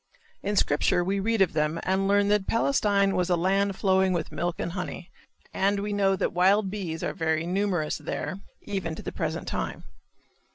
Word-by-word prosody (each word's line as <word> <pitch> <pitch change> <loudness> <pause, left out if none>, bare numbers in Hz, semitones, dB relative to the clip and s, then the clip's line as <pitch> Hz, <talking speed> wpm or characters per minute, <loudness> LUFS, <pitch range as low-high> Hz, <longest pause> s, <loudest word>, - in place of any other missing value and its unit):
In 205 +1 -2
Scripture 175 0 +2
we 195 +2 0
read 220 0 +3
of 185 - -2
them 155 +1 0
and 190 +1 +1
learn 200 0 +3
that 205 -2 +2
Palestine 205 -5 +2
was 180 0 0
"a 175 - +4
land 195 +3 +1
flowing 190 -1 +2
with 165 -3 -2
milk 175 +1 -2
and 170 - -3
honey" 180 0 -6 0.4
and 200 +1 +1
we 205 +1 -3
know 195 -1 +2
that - - -1
wild 190 +3 +3
bees 175 -6 -4
are - - -1
very 160 -2 0
numerous 180 -4 -1
there 165 +6 -4 0.2
even 190 -6 -3
to - - -9
the - - -4
present - - -3
time. - - -3
190 Hz, 190 wpm, -27 LUFS, 175-200 Hz, 0.4 s, a